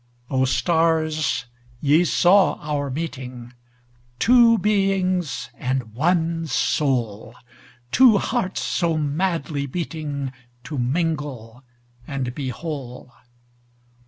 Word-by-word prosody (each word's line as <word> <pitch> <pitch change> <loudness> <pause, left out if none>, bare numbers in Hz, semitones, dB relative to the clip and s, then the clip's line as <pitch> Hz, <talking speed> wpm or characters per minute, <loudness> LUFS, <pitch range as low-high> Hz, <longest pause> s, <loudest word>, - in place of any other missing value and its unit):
O, 130 -1 +2
stars, 155 -3 +1 0.3
ye 150 +5 +4
saw 185 +4 +4
our 145 -2 -3
meeting, 130 -5 -6 0.6
Two 235 - +5
beings 190 - 0
and 125 -4 -2
one 165 +4 0
soul, 120 -5 -1 0.6
Two 250 -5 +6
hearts 210 -4 -1
so 170 -3 0
madly 150 -1 -1
beatingTo 140 -4 -6
mingle 135 -4 -2 0.4
and 130 -3 -3
be 135 -1 -4
whole! 130 -3 -7
150 Hz, 85 wpm, -22 LUFS, 130-170 Hz, 0.6 s, Two